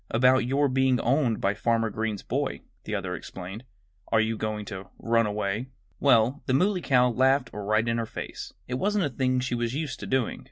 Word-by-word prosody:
"About 125 +1 +4
your 140 +2 +2
being 130 -1 +2
owned 125 -2 +1
by 100 - +1
Farmer 115 0 0
Green's 110 -1 -3
boy," - - -2 0.2
the - - -2
other - - -3
explained. 95 +6 -8 0.5
"Are 110 - +4
you 110 +1 +1
going 105 -1 -3
to 95 -1 -7
run 115 -1 +2
away?" 105 +3 -2 0.3
Well, 130 0 +4
the 130 - +2
Muley 185 +5 +2
Cow 125 -4 +3
laughed 130 +3 +2
right 110 +2 0
in 115 0 +1
her 115 - -2
face. - - -7 0.2
It 125 +1 -3
wasn't 205 0 +1
a - - -1
thing 130 0 0
she 125 -1 -2
was 120 +1 -1
used 145 -4 -3
to - - -6
doing. 130 -3 0
120 Hz, 200 wpm, -27 LUFS, 110-130 Hz, 0.5 s, About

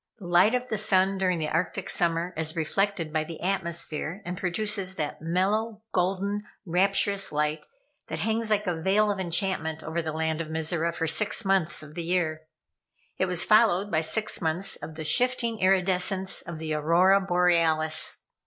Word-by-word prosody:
The 200 - -11
light 180 +7 +4
of 250 0 -2
the 215 - -1
sun 195 -2 +2
during 185 -2 +1
the 155 -1 -2
Arctic 185 +4 -2
summer 170 +1 0
is 160 +1 -2
reflected 165 0 -1
by 155 -1 +1
the 160 0 -9
atmosphere, 170 -1 -3
and 175 +1 -4
produces 190 +1 -2
that 150 -3 -4
mellow, 205 +6 -1
golden, 195 +3 0 0.2
rapturous 195 +3 +1
light 150 +1 -1 0.4
that - - -4
hangs 225 0 -1
like 210 -1 +1
a 180 - 0
veil 205 +4 +2
of 200 - -4
enchantment 175 -3 0
over 160 +2 -2
the 160 -1 -4
land 160 +1 -2
of 165 - -5
Mizora 160 +1 -1
for 170 -1 -3
six 205 +7 +1
months 180 -5 +1
in 150 0 -12
the 170 - -4
year. 165 -2 -1 0.7
It 185 - +1
was 180 -1 +2
followed 210 -2 +4
by 155 - +2
six 215 +8 -2
months 165 +4 -1
of 155 +1 -9
the 160 - -5
shifting 235 +4 +2
iridescence 190 0 +1
of 170 -3 -8
the 155 0 -4
Aurora 175 +6 +4
Borealis. 170 -4 +2
180 Hz, 170 wpm, -26 LUFS, 160-195 Hz, 0.7 s, light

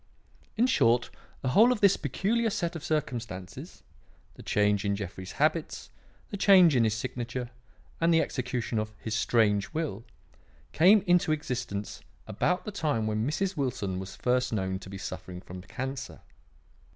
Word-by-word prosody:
"In 235 - +4
short, 120 - +2 0.3
the 130 - 0
whole 220 - +6
of 245 - 0
this 200 -2 +5
peculiar 215 - 0
set 175 -4 -2
of 160 - -6
circumstances 120 - -4 0.5
the - - -13
change 105 -1 +1
in 100 -1 0
Jeffrey's 95 -2 -7
habits, - - -1 0.4
the 200 - -3
change 185 -6 +6
in 120 -2 +4
his 110 -1 +1
signature, 120 +1 -4 0.5
and 165 +1 +3
the 165 - +5
execution 125 -6 -2
of 110 0 -4
his 110 - -5
strange 110 -2 +2
will 150 -10 -3 0.7
came 190 +5 +5
into 180 -2 +3
existence 125 -9 -3 0.2
about 180 - -1
the 210 - -4
time 150 - -1
when 110 +2 -1
Mrs. 190 +5 -1
Wilson 110 - -2
was 95 0 -7
first 125 0 0
known 95 -3 -2
to 95 - -11
be 95 - -7
suffering 90 -1 -7
from 90 0 -10
cancer. 130 +6 -6
125 Hz, 155 wpm, -28 LUFS, 105-165 Hz, 0.7 s, whole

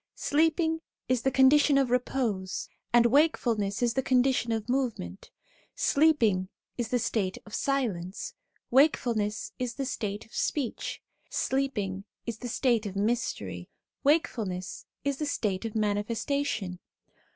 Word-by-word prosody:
Sleep 315 +3 +2
ing 320 -1 +1 0.3
is 255 -2 +1
the 265 - +2
condition 275 +2 +5
of 270 -3 +2
repose, 235 -7 -1 0.2
and 240 0 +6
wakefulness 235 -7 +2
is 235 -1 +2
the 265 - +1
condition 255 -2 +2
of 220 -1 -2
movement; 245 - -2 0.5
sleeping 230 -12 +3 0.3
is 240 -2 -2
the 250 - +1
state 220 -5 -1
of 210 - -13
silence, 210 -10 -1 0.4
wakefulness 235 -6 +2
is 245 -2 -2
the 275 - -2
state 210 -5 -3
of 225 - -23
speech; 275 -6 -2 0.3
sleeping 210 -8 -1 0.2
is 230 -2 -4
the 250 - -5
state 235 -3 +1
of 195 - -7
mystery, 195 - -2 0.3
wakefulness 225 - 0 0.2
is 280 0 0
the 300 - -2
state 210 -7 -1
of 225 - -4
manifestation. 210 -1 -1
235 Hz, 130 wpm, -28 LUFS, 205-270 Hz, 0.5 s, and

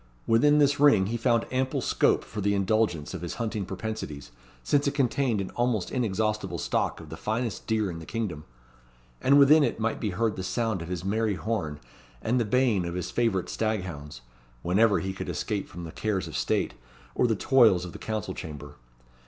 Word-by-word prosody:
Within 145 +6 +4
this 145 -1 +3
ring 140 -10 +6
he 110 +4 -2
found 115 0 +2
ample 130 0 0
scope - - +2
for 105 - -6
the 100 +1 +1
indulgence 100 -6 0
of 95 - -5
his 85 - -5
hunting 110 -4 -3
propensities, 95 - -5 0.3
since 145 - +2
it 140 - -1
contained 130 -4 +1
an 95 - -4
almost 120 -5 -1
inexhaustible 110 -3 -1
stock - - -1
of - - -11
the - - -6
finest 110 0 -3
deer 110 -4 0
in 80 - -7
the 80 - -11
kingdom; 100 -10 -3 0.8
and 140 +2 +5
within 145 +2 +7
it 140 - -1
might 115 0 -1
be 110 - -1
heard 110 +3 -1
the 95 - -4
sound 110 -1 -1
of 85 - -6
his 90 0 -4
merry 110 +1 0
horn, 90 -9 -3 0.4
and 120 - 0
the 115 - +1
baying 115 -3 +2
of 85 0 -4
his 90 - -4
favourite 115 -7 0
stag 110 -3 -1
hounds, 75 -7 -8 0.4
whenever 100 +4 +3
he 95 0 -3
could - - -6
escape 105 -2 -2
from 85 0 -8
the 80 - -7
cares 95 -3 -2
of 80 - -8
state, - - 0 0.4
or 125 - +2
the 110 - +1
toils 110 -7 +4
of 90 - -7
the - - -9
council 110 -2 -3
chamber. 75 -1 -8
110 Hz, 200 wpm, -27 LUFS, 90-115 Hz, 0.8 s, within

